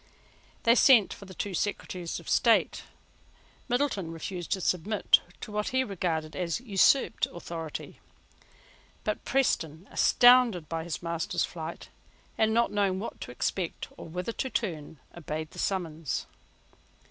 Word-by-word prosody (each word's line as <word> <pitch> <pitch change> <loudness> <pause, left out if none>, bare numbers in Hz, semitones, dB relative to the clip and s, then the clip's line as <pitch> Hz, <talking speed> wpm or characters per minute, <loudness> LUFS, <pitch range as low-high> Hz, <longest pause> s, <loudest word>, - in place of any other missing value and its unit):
They 230 - +6
sent 240 -4 +6
for 200 - -11
the 190 -1 -12
two 200 +2 -3
Secretaries 180 -2 -3
of - - -15
State. - - +3 0.8
Middleton 245 - 0
refused 175 +2 -6
to 195 - -2
submit 190 +4 +2 0.2
to - - -7
what 210 0 -1
he 260 0 +1
regarded 165 -7 -2
as 175 0 -1
an 255 - -18
usurped 215 +5 +3
authority: 165 -2 -7 1.0
but - - -2
Preston, 175 - 0
astounded 245 -9 +5
by 165 -1 -3
his 175 0 -5
master's 170 -1 -1
flight, 165 -1 -7 0.5
and 220 0 +2
not 235 +1 +2
knowing 195 -2 +1
what 220 - -6
to - - -6
expect, 170 +7 -3
or - - -9
whither 180 +6 -4
to 260 +3 -3
turn, 160 -10 -3 0.2
obeyed 155 -2 -5
the - - -10
summons. 165 -7 -2
185 Hz, 140 wpm, -28 LUFS, 165-220 Hz, 1.0 s, They